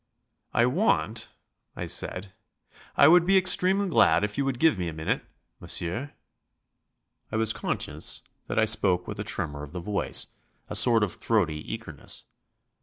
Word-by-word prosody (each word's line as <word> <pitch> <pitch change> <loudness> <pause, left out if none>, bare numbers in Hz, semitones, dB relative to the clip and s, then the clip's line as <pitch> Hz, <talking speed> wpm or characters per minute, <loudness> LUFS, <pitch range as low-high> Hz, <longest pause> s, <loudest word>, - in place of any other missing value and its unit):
"I 120 - +2
want," 125 - 0 0.5
I - - -5
said, 95 +1 -2 0.7
"I - - +7
would 175 +1 +6
be 195 +2 +3
extremely 190 +1 +4
glad 170 - +3
if 105 0 -3
you 140 - -1
would 135 -2 -2
give 155 -7 +2
me 90 - -3
a 85 - -5
minute, 80 0 -2 0.4
monsieur." 115 +12 -3 1.2
I - - -4
was 110 0 +2
conscious - - -2 0.2
that - - -5
I 110 - +4
spoke 100 -5 +3
with - - -7
a - - -2
tremour 75 -2 -3
of 75 +2 -10
the 90 - -5
voice, 100 +3 +1 0.4
a - - -6
sort 115 -3 +5
of 100 - -2
throaty 85 -9 -2
eagerness. 110 -10 -5
110 Hz, 160 wpm, -26 LUFS, 90-140 Hz, 1.2 s, I